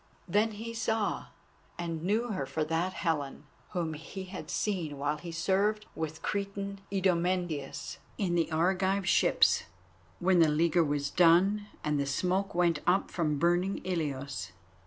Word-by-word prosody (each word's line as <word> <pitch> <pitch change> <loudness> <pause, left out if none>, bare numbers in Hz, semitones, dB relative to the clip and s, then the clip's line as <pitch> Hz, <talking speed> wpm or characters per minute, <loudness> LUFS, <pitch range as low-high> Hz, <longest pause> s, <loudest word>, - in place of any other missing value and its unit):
Then 210 +4 +2
he 225 +2 -6
saw 220 -2 -1 0.5
and 165 -2 -3
knew 215 +7 0
her 165 -11 -2
for 155 +3 -1
that 165 +4 -1
Helen 150 -6 -2 0.3
whom 170 -3 -1
he 160 +5 -7
had 185 0 -8
seen 170 -9 -1
while 145 +2 -1
he 175 - -7
served 200 +5 +1
with 160 0 -5
Cretan 200 -1 -3
Idomeneus 175 -6 -1 0.2
in 185 -4 0
the 170 -1 +1
Argive 190 +3 +1
ships, - - +4 0.5
when 185 0 +4
the 160 -2 +6
leaguer 165 +3 +3
was 145 -1 -1
done 185 +5 +4 0.2
and 150 -1 0
the 140 - 0
smoke 185 +8 0
went 170 -3 +3
up 185 +2 +2
from 155 -4 0
burning 175 +5 +2
Ilios. 140 - -3
175 Hz, 145 wpm, -30 LUFS, 155-195 Hz, 0.5 s, the